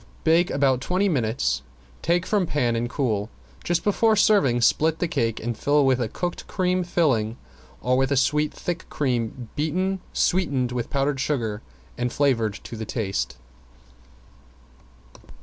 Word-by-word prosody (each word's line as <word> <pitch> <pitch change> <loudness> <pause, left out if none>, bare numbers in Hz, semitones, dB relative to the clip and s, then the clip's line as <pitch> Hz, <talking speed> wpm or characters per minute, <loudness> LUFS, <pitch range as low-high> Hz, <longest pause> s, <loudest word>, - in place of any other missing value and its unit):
Bake 165 +2 +4
about 135 -2 +2
twenty 185 +7 +1
minutes, 110 - 0 0.4
take 175 +1 +1
from 195 -2 +1
pan 120 -6 +1
and 120 +1 -1
cool. 110 -7 -1 0.3
Just 175 -1 0
before 220 +2 +3
serving 195 - +4
split 160 +6 +3
the 175 - -1
cake 115 -7 -1
and 120 +1 -3
fill 145 +5 +2
with 130 -1 +3
a 115 - 0
cooked 175 +8 -4
cream 185 -1 0
filling 130 -11 +1 0.4
or 125 +1 +2
with 135 +1 +2
sweet 150 +3 +2
thick 175 0 -5
cream 120 -3 -2
beaten, 185 +6 -1
sweetened 140 -9 +1
with 120 -1 -3
powdered 140 -1 0
sugar 115 -7 -1 0.4
and 125 0 0
flavored 115 -8 +1
to - - -8
the 110 - -5
taste. 100 - -3
135 Hz, 145 wpm, -24 LUFS, 120-170 Hz, 0.4 s, Bake